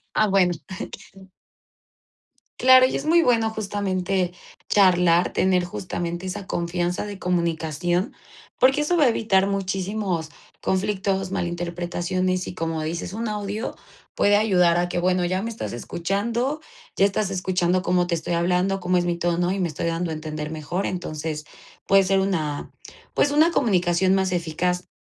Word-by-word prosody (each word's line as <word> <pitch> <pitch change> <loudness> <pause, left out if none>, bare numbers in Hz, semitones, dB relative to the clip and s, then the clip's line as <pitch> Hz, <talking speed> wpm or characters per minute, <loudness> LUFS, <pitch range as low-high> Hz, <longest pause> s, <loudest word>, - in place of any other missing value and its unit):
Ah, 215 - +4
bueno. 190 -3 +3
Sí. 190 +3 -8 1.8
Claro, 255 0 +7
y - - 0
es 280 - -6
muy 335 +2 +5
bueno 230 -5 +2
justamente 195 -4 -1 0.3
charlar, 180 -3 +4
tener 185 -1 +2
justamente 175 0 -4
esa 185 +1 -5
confianza 175 +2 -2
de 205 -1 -7
comunicación, 175 - -1 0.5
porque 265 +3 +4
eso 340 +4 +1
va 300 - +5
a - - +5
evitar 200 -4 +2
muchísimos 195 -3 -2 0.3
conflictos, 195 -1 -1
mal 190 -3 -1
interpretaciones 175 +1 -2
y, - - -5
como 165 -2 -2
dices, 170 +3 -4
un 225 +1 -3
audio 210 +1 -4 0.4
puede 205 0 +3
ayudar 180 -5 +4
a 175 0 0
que, 175 - -1
bueno, 180 0 +1
ya 185 +2 0
me 230 - -3
estás 225 - -5
escuchando, 225 - -2 0.4
ya 195 - +5
estás 200 0 0
escuchando 185 -1 0
cómo 180 -1 +1
te 170 - 0
estoy 165 +1 -3
hablando, 180 +3 +1
cómo 180 0 +1
es 175 - +1
mi 175 -1 0
tono 175 +1 0
y 195 - -3
me 175 - 0
estoy 155 +2 -4
dando 165 0 -1
a - - -2
entender 155 -1 -5
mejor. 160 +5 -3
Entonces, 155 -3 -4 0.4
puede 195 0 +6
ser 195 +1 +2
una, 160 -7 -2 0.4
pues, 285 - +2
una 310 +4 +4
comunicación 185 - +2
más 190 -1 0
eficaz 180 +2 -1
185 Hz, 160 wpm, -23 LUFS, 175-200 Hz, 1.8 s, Claro